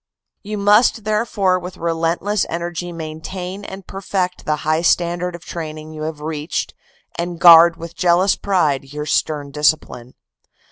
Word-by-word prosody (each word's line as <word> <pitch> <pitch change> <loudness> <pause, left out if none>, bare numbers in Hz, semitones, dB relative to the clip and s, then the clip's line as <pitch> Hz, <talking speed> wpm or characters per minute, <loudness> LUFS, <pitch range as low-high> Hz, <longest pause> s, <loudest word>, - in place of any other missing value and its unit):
You 210 +1 -5
must 210 +3 +4
therefore 210 -3 +1
with 180 +1 -8
relentless 170 +5 -1
energy 175 +1 -4
maintain 180 +4 -6
and 190 -1 -9
perfect 185 -1 -3
the 155 - +1
high 155 +1 +2
standard 175 +1 +1
of 170 - -12
training 155 -2 -7
you 155 - -8
have 150 -2 -10
reached, 155 +1 -3 0.5
and 175 0 -3
guard 170 -1 +8
with 170 0 -8
jealous 180 +2 +3
pride 145 -8 0
your 150 0 -4
stern 145 -2 -1
discipline. 145 -4 -1
170 Hz, 140 wpm, -19 LUFS, 155-185 Hz, 0.5 s, guard